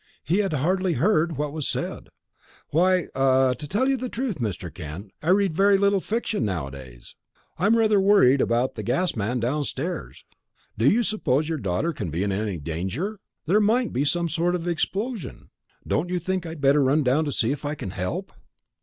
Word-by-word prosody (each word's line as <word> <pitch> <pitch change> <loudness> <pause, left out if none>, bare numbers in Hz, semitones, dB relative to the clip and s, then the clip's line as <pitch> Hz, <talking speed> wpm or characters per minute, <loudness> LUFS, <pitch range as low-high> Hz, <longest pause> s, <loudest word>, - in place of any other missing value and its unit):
He 175 +6 +1
had 195 -5 0
hardly 180 +5 +1
heard 165 - +1
what 145 0 -2
was 155 -3 -3
said. - - -4 0.6
"Why 180 +3 +2
ah 130 -1 +3
to 145 +4 -8
tell 210 - +1
you 270 0 +2
the 255 0 -4
truth, 235 - -3
Mr. 95 -7 -4
Kent, 90 +4 -8
I 160 - -2
read 195 -2 +3
very 200 +2 +5
little 200 0 +3
fiction 220 - -2
nowadays. 70 - -6 0.4
I'm 205 +6 +4
rather 215 -3 +4
worried 190 -10 +5
about 120 +2 +1
that 110 - -6
gas 135 - 0
man 115 +3 -1
downstairs. 145 +6 -3 0.5
Do 115 +5 +3
you 235 +3 +3
suppose 155 - 0
your 160 -2 -2
daughter 100 - -1
can 105 - -4
be 85 +5 -2
in 100 - -1
any 100 -1 -2
danger? 95 - -4 0.3
There 200 +7 +3
might 230 +3 +2
be 130 - +1
some 170 +4 +1
sort 170 +2 0
of 175 -1 -4
explosion 195 +5 -3 0.4
don't 175 +4 0
you 180 - 0
think 180 0 -2
I - - -5
had 160 -3 -8
better 140 +1 +4
run 140 +3 +3
down 135 +5 +2
to 145 - -2
see 120 -1 +1
if 145 - -4
I 145 +1 -2
can 95 - -6
help?" 155 - -4
155 Hz, 195 wpm, -24 LUFS, 120-190 Hz, 0.6 s, very